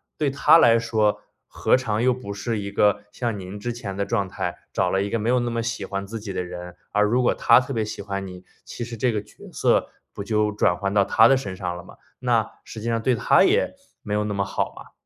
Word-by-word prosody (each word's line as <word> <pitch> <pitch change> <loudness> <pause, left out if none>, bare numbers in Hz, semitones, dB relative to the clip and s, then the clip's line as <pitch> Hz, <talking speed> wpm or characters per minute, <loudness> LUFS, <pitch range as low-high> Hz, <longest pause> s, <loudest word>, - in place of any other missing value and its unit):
对 150 -2 0
他 140 +4 +5
来 115 -5 +6
说， 110 -2 0 0.2
何 - - +2
尝 115 -3 -1
又 130 0 +4
不 125 -5 -7
是 110 +2 -2
一 100 0 -5
个 105 0 +2
像 115 -3 -3
您 95 +2 -8
之 120 +3 -3
前 100 -5 -6
的 100 - 0
状 100 -3 -1
态， - - -4
找 - - 0
了 95 - +1
一 100 - -2
个 115 - 0
没 110 0 -3
有 125 +1 +3
那 120 0 -1
么 115 -1 -2
喜 115 -4 -3
欢 100 0 -4
自 110 +3 -6
己 105 -1 -6
的 90 - -2
人。 90 0 -8 0.2
而 105 - +3
如 120 +5 +2
果 - - +3
他 - - +5
特 130 +2 -5
别 110 -3 0
喜 105 -1 -6
欢 100 -1 -4
你， 90 0 -10 0.2
其 120 - -7
实 115 0 -7
这 120 +2 +1
个 105 -2 -2
角 - - -15
色 - - +2 0.2
不 100 - -6
就 105 0 +1
转 100 -4 +2
换 100 +2 -2
到 100 -1 +4
他 110 +3 +6
的 135 - +5
身 100 -8 -5
上 90 -2 -4
了 90 - -9
吗？ - - -15 0.2
那 120 -3 +1
实 110 - -9
际 115 - -5
上 115 -1 0
对 130 - +3
他 - - +4
也 - - +2 0.3
没 105 - -5
有 105 - +1
那 105 0 -2
么 100 0 0
好 95 - -2
嘛。 - - -13
105 Hz, 285 characters per minute, -23 LUFS, 100-120 Hz, 0.3 s, 来